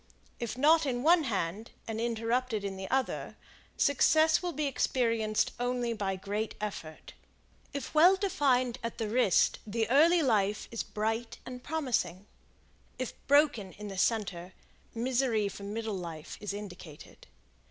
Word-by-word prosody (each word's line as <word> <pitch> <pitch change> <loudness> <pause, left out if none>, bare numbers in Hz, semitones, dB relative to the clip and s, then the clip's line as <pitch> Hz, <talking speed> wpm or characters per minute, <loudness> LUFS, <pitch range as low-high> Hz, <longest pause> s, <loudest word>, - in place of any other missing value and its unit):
If 235 0 -4
not 310 +3 +4
in 245 -1 -1
one 330 0 +5
hand 200 0 -2 0.2
and 225 0 -3
interrupted 230 -1 -1
in 195 -1 -3
the 190 0 -6
other, 265 0 -1 0.4
success 315 +3 +4
will 355 -1 -2
be 305 -1 -2
experienced 230 -5 +1
only 245 -1 -1
by 195 -3 -2
great 205 +3 -3
effort. 180 -7 -6 0.6
If 280 -2 -5
well 345 +5 +7
defined 260 - +1
at 230 0 -5
the 220 - -2
wrist 220 -4 +3
the 225 +1 -1
early 325 +5 +5
life 210 -5 +1
is 230 - -2
bright 225 +2 -3
and 250 0 -8
promising; 255 - -1 0.7
if 255 -1 -4
broken 280 -10 +3
in 210 0 -8
the 195 - -7
center, 190 -4 -1 0.4
misery 240 -3 +1
for 200 - -8
middle 215 +2 -4
life 165 -4 -7
is 205 - -4
indicated. 180 -7 -10
230 Hz, 140 wpm, -30 LUFS, 205-265 Hz, 0.7 s, well